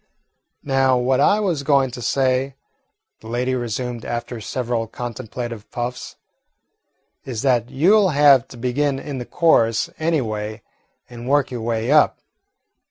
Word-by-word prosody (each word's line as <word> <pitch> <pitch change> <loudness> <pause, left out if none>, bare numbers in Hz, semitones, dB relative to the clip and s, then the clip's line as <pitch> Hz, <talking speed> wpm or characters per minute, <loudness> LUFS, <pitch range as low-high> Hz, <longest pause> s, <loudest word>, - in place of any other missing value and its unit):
"Now, 135 -2 +2
what 130 +2 +1
I 205 +9 +4
was 180 -8 -1
going 140 -2 +2
to 125 - -8
say," 130 +1 0 0.6
the 110 - -13
lady 125 +3 -1
resumed 120 -1 -3
after 120 0 -5
several 120 0 -2
contemplative 120 -1 -6
puffs, 120 +1 -5 1.1
"is 125 -2 -5
that 125 -4 +2
you 170 +10 +4
'll 205 -3 +4
have 145 -5 +5
to 125 - -12
begin 135 +3 0
in 135 -1 -6
the 125 - -5
chorus 115 -10 +2
any 160 0 +1
way 110 -1 -5 0.4
and 120 0 -8
work 145 -1 +2
your 120 -2 -4
way 115 +2 -1
up. 150 0 +4
125 Hz, 145 wpm, -21 LUFS, 120-140 Hz, 1.1 s, have